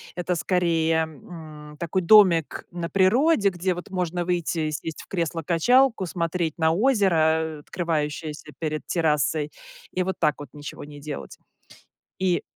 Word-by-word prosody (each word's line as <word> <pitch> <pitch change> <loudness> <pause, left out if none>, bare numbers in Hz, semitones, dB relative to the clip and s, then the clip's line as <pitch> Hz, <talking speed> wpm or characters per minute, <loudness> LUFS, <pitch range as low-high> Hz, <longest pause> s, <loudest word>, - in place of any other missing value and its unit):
Это, 180 0 -1
скорее, 165 -2 +1
м, 155 -1 -10
такой 170 +4 -1
домик 175 -5 +5
на 175 -1 -4
природе, 205 - +3
где, 180 0 -1
вот, 175 +3 -8
можно 180 -2 -2
выйти 175 -1 -1
и - - -2
сесть 155 +2 -5
в - - -19
кресло-качалку, 180 - +2
смотреть 170 -2 -2
на 160 -1 +3
озеро, 205 -1 +3
э, 160 -1 +1
открывающееся 155 -2 -3
перед 155 -2 -3
террасой, 150 -2 +1 0.4
и 185 - 0
вот 190 0 -2
так 150 -3 +2
вот 145 - -8
ничего 145 -1 -8
не 145 -1 -11
делать. 145 0 -7 0.8
И 185 -2 +1
170 Hz, 145 wpm, -24 LUFS, 155-185 Hz, 0.8 s, домик